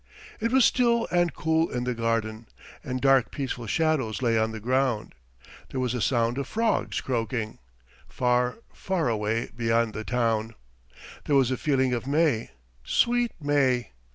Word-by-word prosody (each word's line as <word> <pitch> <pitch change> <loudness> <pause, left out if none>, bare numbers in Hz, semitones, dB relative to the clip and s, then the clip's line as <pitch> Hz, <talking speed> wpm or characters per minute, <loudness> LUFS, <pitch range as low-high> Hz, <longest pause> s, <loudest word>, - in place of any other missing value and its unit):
It 230 - -1
was 260 -2 +5
still 235 -2 +2
and 175 -1 +2
cool 160 +2 0
in 125 0 -3
the 125 0 -1
garden, 115 -1 -2 0.4
and 130 0 -3
dark 135 -2 +4
peaceful 125 -4 -4
shadows 145 -5 0
lay 120 -3 +1
on 110 0 +2
the 110 - -6
ground. 125 0 0 0.6
There 130 - -4
was 125 -2 0
a 125 - -2
sound 120 +1 +1
of 140 - -3
frogs 225 0 0
croaking, 115 -3 -3 0.5
far, 125 +2 0 0.2
far 180 -8 -1
away 110 +1 -1
beyond 115 -1 +1
the 110 - -5
town. 115 -2 -1 0.7
There 145 - +1
was 130 -2 +3
a - - +1
feeling 130 -4 +1
of 120 +2 -3
May, 145 -6 +1 0.3
sweet 240 -1 +1
May! 140 - +1
125 Hz, 155 wpm, -26 LUFS, 115-145 Hz, 0.7 s, was